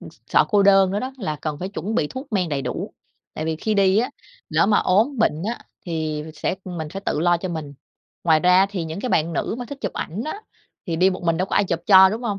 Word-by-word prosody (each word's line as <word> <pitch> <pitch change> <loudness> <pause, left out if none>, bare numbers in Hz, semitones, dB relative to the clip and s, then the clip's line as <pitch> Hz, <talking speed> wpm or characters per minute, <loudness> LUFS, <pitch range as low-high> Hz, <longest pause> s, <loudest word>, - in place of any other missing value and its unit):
ừ, - - -10 0.2
sợ - - +4
cô 205 -2 +4
đơn 195 -1 +5
nữa 205 - -1
đó 260 +1 -4
là 155 -8 -3
cần 150 0 -4
phải 185 +3 -4
chuẩn 205 +2 -4
bị 150 - +1
thuốc 260 - -9
men 185 -4 +1
đầy 140 -2 -2
đủ, - - -4 0.4
tại 155 - -4
vì 160 0 -1
khi 215 +6 -1
đi 195 0 +4
á, 245 - 0 0.4
lỡ - - +2
mà 205 0 +4
ốm 225 +8 +2
bệnh 160 -7 +1
á 240 - -5 0.3
thì 155 -2 -2
sẽ, 150 - -2
ừm, 180 -2 -6
mình 155 - -4
phải 195 +5 -6
tự 150 - 0
lo 175 0 +3
cho 185 +2 -5
mình. 155 -4 -5 0.5
Ngoài 160 -2 +4
ra 180 0 +5
á 195 - +5
thì 180 -5 -3
những 160 +4 -5
cái 255 - -3
bạn 165 -3 +1
nữ 160 - -2
mà 245 - -4
thích 285 -1 -7
chụp 200 - -3
ảnh 190 +8 -4
á, 405 +7 -5 0.5
thì 165 -2 -2
đi 185 +3 +4
một 185 - -5
mình 165 -1 +1
đâu 185 +2 0
có - - -3
ai 200 - +4
chụp 170 -2 -1
cho, 190 -1 +8
đúng 220 +5 -4
hông? 210 -4 -2
185 Hz, 280 wpm, -22 LUFS, 160-205 Hz, 0.5 s, cho